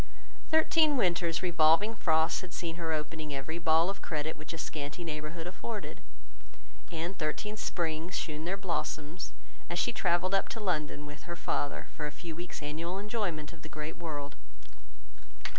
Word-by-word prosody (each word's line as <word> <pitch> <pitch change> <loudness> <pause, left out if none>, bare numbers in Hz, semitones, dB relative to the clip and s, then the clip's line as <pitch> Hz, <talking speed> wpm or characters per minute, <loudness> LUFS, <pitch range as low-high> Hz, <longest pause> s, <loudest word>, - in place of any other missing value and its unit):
Thirteen 315 -2 +6
winters' 170 -5 +3
revolving 170 +4 +5
frosts 160 -5 +3
had 185 -2 -8
seen 170 -1 -2
her 165 -2 -1
opening 155 -1 -2
every 160 +5 -3
ball 165 0 +5
of 195 - -2
credit 155 0 -1
which 155 - -6
a 165 - -4
scanty 150 +1 -3
neighbourhood 155 +1 -4
afforded, 205 +4 -4 0.9
and 170 +3 -2
thirteen 180 +7 -1
springs 170 -3 -1
shewn 155 -1 -2
their 190 +3 0
blossoms, 170 -3 -2 0.4
as 175 - -1
she - - +2
travelled 175 +2 +2
up 195 - +3
to 225 - -3
London 155 -7 0
with 150 +3 -9
her 175 - -2
father, 145 -3 -1
for 150 - -2
a - - -4
few 165 +2 -6
weeks' 175 -2 -5
annual 165 +5 -2
enjoyment 200 -7 -1
of 165 - -13
the 160 - -8
great 155 +1 -4
world. 145 -4 -4
165 Hz, 160 wpm, -32 LUFS, 155-180 Hz, 0.9 s, Thirteen